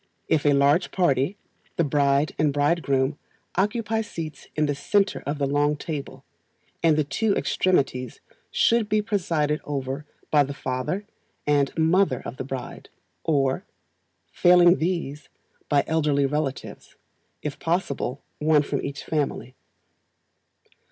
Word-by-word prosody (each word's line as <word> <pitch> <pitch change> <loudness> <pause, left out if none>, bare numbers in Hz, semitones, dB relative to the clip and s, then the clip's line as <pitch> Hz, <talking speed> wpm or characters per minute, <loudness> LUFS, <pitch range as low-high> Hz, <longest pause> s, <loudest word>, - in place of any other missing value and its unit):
If 150 -2 +2
a 145 - +5
large 140 +4 +3
party, 175 0 +1 0.4
the 170 - +2
bride 140 0 +2
and 150 -2 +3
bridegroom 145 -1 +1 0.4
occupy 220 +3 0
seats 165 -7 -7
in 155 - +2
the 145 - 0
centre 195 +7 +1
of 145 +1 -1
the 140 - 0
long 145 +2 +2
table, 150 -3 -6 0.6
and 160 -2 +4
the 155 - +3
two 205 +8 0
extremities 135 -9 0 0.3
should 230 -2 +2
be 215 0 +2
presided 165 -8 0
over 140 0 -4 0.2
by 150 - +5
the 140 0 -5
father 130 +12 -3 0.4
and 145 -2 +2
mother 165 -3 +2
of 115 - -6
the - - -3
bride, 130 -1 -7 0.3
or, 135 -4 +1 0.7
failing 175 - +6
these, 160 -4 -3 0.4
by 145 -2 +3
elderly 150 -3 +2
relatives, 145 -1 -4 0.5
if 145 -1 -4
possible 145 -6 -2 0.2
one 150 -1 +4
from - - -2
each 140 - -5
family. 145 -4 -2
150 Hz, 130 wpm, -25 LUFS, 140-170 Hz, 0.7 s, failing